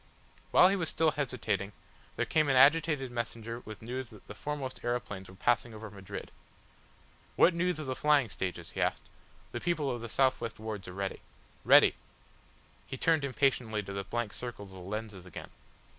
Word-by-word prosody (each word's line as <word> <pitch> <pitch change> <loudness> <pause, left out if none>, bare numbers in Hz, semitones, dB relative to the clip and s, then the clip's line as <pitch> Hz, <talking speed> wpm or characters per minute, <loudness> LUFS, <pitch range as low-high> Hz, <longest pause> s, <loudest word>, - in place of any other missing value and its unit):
While 180 - +7
he 195 - +2
was 175 -4 0
still 160 -1 +3
hesitating 110 -8 -2 0.4
there - - 0
came 155 -2 +2
an 135 - +3
agitated 145 -1 +5
messenger 115 -1 -4
with 110 0 -9
news 125 +1 -4
that 105 - -15
the - - -7
foremost 140 +2 -5
aeroplanes 105 -6 -3
were 95 - -12
passing 120 +2 +1
over 110 -1 -8
Madrid. 100 0 -8 1.0
"What 175 - +6
news 180 0 0
of 155 - -4
the 130 - -1
flying 150 -4 +4
stages?" 95 -3 -4
he - - -3
asked. - - 0 0.5
"The - - -4
people 155 -6 0
of 120 -2 -4
the 115 - -6
south 130 +2 +2
west 115 -1 -4
wards 105 -3 -6
are 90 - -7
ready." 95 0 -3 0.4
"Ready!" - - +7 0.9
He 130 - -5
turned 160 +1 +3
impatiently 125 -6 +1
to 100 0 -7
the 100 0 -3
blank 115 +1 -3
circles 115 -5 -7
of 95 - -11
the - - -9
lenses 105 -2 -6
again. 90 - -9
120 Hz, 185 wpm, -31 LUFS, 105-140 Hz, 1.0 s, While